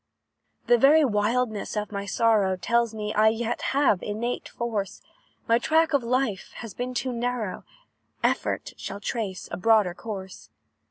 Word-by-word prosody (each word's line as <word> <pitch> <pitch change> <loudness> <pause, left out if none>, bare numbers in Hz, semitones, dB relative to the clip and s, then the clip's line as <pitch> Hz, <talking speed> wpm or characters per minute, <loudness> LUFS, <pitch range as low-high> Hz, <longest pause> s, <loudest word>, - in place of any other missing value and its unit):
"The 240 0 +4
very 295 +4 +6
wildness 220 0 0
of 210 0 -3
my 200 -1 -4
sorrow 210 -4 +2
Tells 235 +5 +1
me 210 0 -3
I 215 +1 +4
yet 225 +1 0
have 265 -9 +3
innate 230 +4 -3
force; 210 -5 -3 0.5
My 230 +1 +4
track 320 +4 +2
of 280 - +3
life 240 -4 -1
has 230 -5 -8
been 250 +3 -4
too 250 +1 -1
narrow, 235 -4 -3 0.6
Effort - - 0
shall 200 - -6
trace 205 -3 -4
a - - -3
broader 210 -2 +3
course. 190 -2 -8
225 Hz, 150 wpm, -26 LUFS, 205-245 Hz, 0.6 s, very